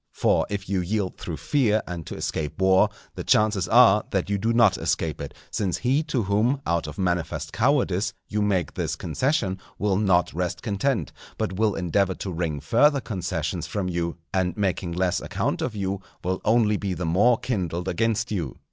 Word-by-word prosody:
For - - +2
if 100 -1 -4
you 95 0 0
yield 95 +1 -2
through 80 -3 -5
fear 110 -7 +1
and 85 -3 -6
to - - -6
escape 75 +2 -3
war, 95 +2 +5 0.2
the - - -6
chances 105 -4 +2
are 110 -3 +6
that 95 0 -1
you 100 - +1
do 115 +3 +1
not 115 -4 +5
escape 80 -3 -1
it; 70 - -7 0.2
since 100 -5 -1
he 130 +5 +2
to 135 -7 0
whom, 110 +8 +1
out 85 -2 0
of 75 - -8
manifest 85 -4 -2
cowardice 115 -6 +2 0.2
you 105 0 -1
make 95 -7 0
this - - -2
concession, 130 -9 -1 0.2
will 100 -2 +1
not 95 -4 +2
rest 90 +2 -3
content, 115 +3 -1 0.3
but 95 - -2
will 105 +2 +1
endeavour 95 +2 +1
to 95 - -5
wring 80 -3 -2
further 140 - +3
concessions 90 - -3
from 100 -3 -2
you, 85 -1 -2 0.2
and 90 -2 0
making 95 -3 -1
less 90 0 0
account - - -2
of 120 - -2
you, 100 -1 -2 0.2
will 95 +1 -1
only 110 -1 +3
be 95 -3 -3
the 90 +1 -3
more 105 +9 +4
kindled 90 -8 -2
against 115 +5 0
you. 85 - -3
95 Hz, 185 wpm, -25 LUFS, 90-110 Hz, 0.3 s, are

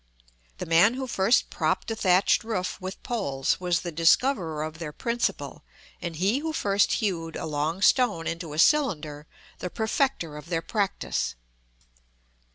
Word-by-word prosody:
The - - -5
man 170 +8 +4
who 265 0 -3
first 225 -1 +2
propped - - -1
a - - -1
thatched 190 +1 +3
roof 190 -6 -3
with 185 +1 -7
poles 140 - -1
was 180 -2 0
the 175 - -5
discoverer 165 - +2
of 155 +1 -6
their 160 -3 -5
principle; 235 +9 -2 0.4
and 170 -2 -4
he 195 - +1
who 320 +1 -3
first 200 -7 +2
hewed 170 -7 -2
a - - -4
long 155 +5 -2
stone 210 -11 +3
into 165 -2 -4
a - - -6
cylinder, 155 - +2 0.3
the 180 - -4
perfecter 220 - -1
of 150 +3 -11
their 165 -2 -1
practice. 205 - -2
180 Hz, 155 wpm, -26 LUFS, 165-225 Hz, 0.4 s, man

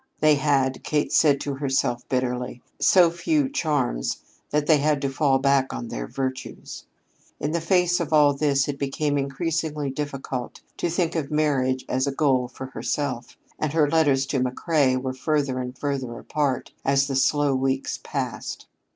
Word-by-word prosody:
They 155 0 +5
had, 135 -2 +1
Kate 150 -1 0
said 145 -3 +4
to 140 - -3
herself 135 -3 -1
bitterly, 125 -1 -2 0.2
so 175 -3 +5
few 285 - +1
charms 145 - -1 0.3
that 150 0 +1
they 155 0 +5
had 150 0 +2
to 135 - 0
fall 135 -1 +2
back 135 0 +2
on 120 - -5
their - - -4
virtues. 130 -1 -5 0.5
In 145 - -2
the 170 0 -1
face 180 +1 +2
of 170 -3 -3
all 150 -2 +5
this 140 -1 +1
it 145 -1 -4
became 145 +1 -1
increasingly 150 +1 -2
difficult 135 -3 -5 0.2
to 175 - -1
think 170 0 0
of 155 -4 -2
marriage 135 -4 +1
as 130 +2 0
a - - +1
goal 135 -3 +2
for 130 - -8
herself, 130 -2 -3 0.2
and 155 -1 -1
her 155 -2 +3
letters 145 -4 +3
to 135 0 -1
McCrea 130 +1 +1
were 130 0 -3
further 140 -1 0
and 125 0 -5
further 130 -5 -3
apart 140 -4 -2
as 135 0 +3
the 140 -1 -3
slow 145 +1 +2
weeks 135 0 -1
passed. - - -4
140 Hz, 170 wpm, -24 LUFS, 130-150 Hz, 0.5 s, They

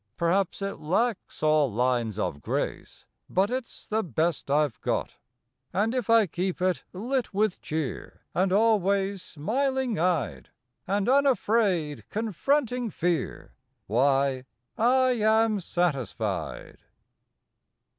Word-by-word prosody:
Perhaps 185 +3 +1
it 195 - -4
lacks 190 +5 -1
all 155 -4 +3
lines 120 -2 0
of 75 -8 -2
grace, - - -4 0.2
But 195 +4 +1
it 255 -1 -1
s - - -13
the 220 +1 0
best 160 - -1
I 150 +2 +4
ve 125 - -15
got, - - -2 0.5
And 215 +4 +1
if 250 -5 -2
I 230 -2 +6
keep 180 +1 -3
it 185 0 0
lit 235 +3 -2
with 210 -2 +1
cheer, 155 -4 -4
And 185 +1 +1
always 200 -2 +2
smiling 255 - -1
eyed, 145 - 0 0.4
And 200 +2 0
unafraid 220 - +2
confronting 240 - 0
fear 175 -3 -2 0.3
Why, 135 +3 +2 0.3
I 255 +3 +3
am 220 0 +3
satisfied. 175 -8 -2
190 Hz, 115 wpm, -27 LUFS, 155-225 Hz, 0.5 s, I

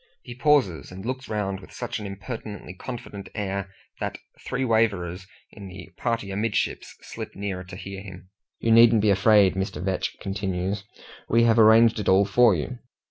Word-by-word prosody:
He 120 - -8
pauses, 125 - +2
and 95 +3 -9
looks 130 +1 -4
round 100 -3 -2
with 95 - -14
such - - -5
an 105 - -6
impertinently 100 -1 -7
confident 110 -1 -8
air, 100 -1 -3 0.3
that - - -3 0.3
three 130 +1 -2
waverers 100 -6 0 0.2
in 100 -2 -10
the 95 0 -10
party 115 -4 -2
amidships 105 +2 -2
slip - - -8
nearer 95 -2 -4
to 90 - -10
hear 95 +1 -7
him. 95 -2 -12 0.3
"You 115 - +1
needn't 115 -1 +7
be 105 - +4
afraid," 100 0 +5
Mr. 95 0 -3
Vetch 95 0 -2
continues, 95 0 -3 0.4
"we 115 +1 +4
have 115 0 +4
arranged 110 +1 +6
it 105 - -1
all 95 +2 +5
for 110 0 +5
you. 120 +10 -4
100 Hz, 170 wpm, -25 LUFS, 95-115 Hz, 0.4 s, needn't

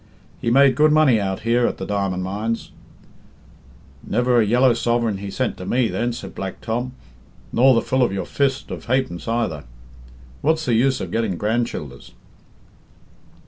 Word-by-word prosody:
"'He 115 - 0
made 135 +2 +5
good 150 +4 +4
money 145 -8 +4
out 95 -1 -3
here, 120 +2 +2
at - - -3
the 95 - -5
diamond 95 -2 -1
mines 105 +5 -3 0.7
'" - - -28 0.6
"Never 125 -1 +2
a - - +2
yellow 125 +3 +4
sovereign 115 -3 0
he 100 0 -6
sent 130 +5 -2
to - - -7
me, 120 -2 +1
then," 120 +1 -1
said 120 - -8
Black 95 -1 -6
Tom, 120 +3 -3 0.6
"nor 130 +2 +5
the 115 - +2
full 130 0 0
of 120 - +3
your 95 -2 -3
fist 135 -2 -1
of - - -7
ha'pence 120 -8 -1
either. 115 -11 -1 0.8
What's 160 +2 +1
the 120 - +1
use 130 +4 +2
of - - -5
getting 110 -6 -1
grand 115 +4 0
childers?" - - -9
120 Hz, 175 wpm, -21 LUFS, 105-130 Hz, 0.8 s, made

